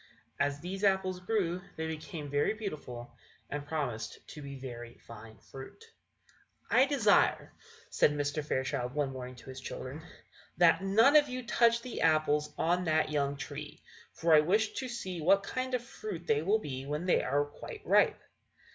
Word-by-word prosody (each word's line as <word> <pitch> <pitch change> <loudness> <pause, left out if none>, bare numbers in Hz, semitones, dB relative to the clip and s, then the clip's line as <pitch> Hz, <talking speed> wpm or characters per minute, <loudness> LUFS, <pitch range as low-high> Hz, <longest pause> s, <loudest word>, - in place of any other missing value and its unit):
As 145 0 0
these 190 +4 -5
apples 190 -2 +2
grew 180 -3 -1
they 160 - -3
became 160 -1 -6
very 145 +8 +1
beautiful, 145 - -7 0.4
and 145 0 -4
promised 140 -8 -3
to 150 - -9
be 140 -1 -7
very 120 -2 -8
fine 110 -1 -13
fruit. 445 - -12 0.8
"I 260 +2 +5
desire," 240 -8 +3 0.4
said - - +4
Mr. 145 +1 -2
Fairchild, 130 -2 -2
one 145 -2 0
morning, 125 -1 -7
to 125 - -13
his 130 0 -9
children, 130 +3 -6 0.6
"that 175 0 +5
none 225 +9 +5
of 295 -2 +6
you 255 -1 -5
touch 235 0 +3
the 250 - -5
apples 155 -2 +2
on 180 +2 +1
that 155 -1 +2
young 140 -1 0
tree, 145 +1 -8 0.3
for 165 -1 +2
I 155 - +9
wish 210 +7 +2
to 260 - -4
see 185 -8 -5
what 195 +5 +4
kind 255 +4 -2
of 245 - -2
fruit 205 -7 -7
they 145 -3 +2
will 200 +7 +3
be 135 -7 -6
when 150 +4 -3
they 180 - +3
are 145 +3 +1
quite 145 - -10
ripe." - - +4
155 Hz, 170 wpm, -31 LUFS, 140-200 Hz, 0.8 s, I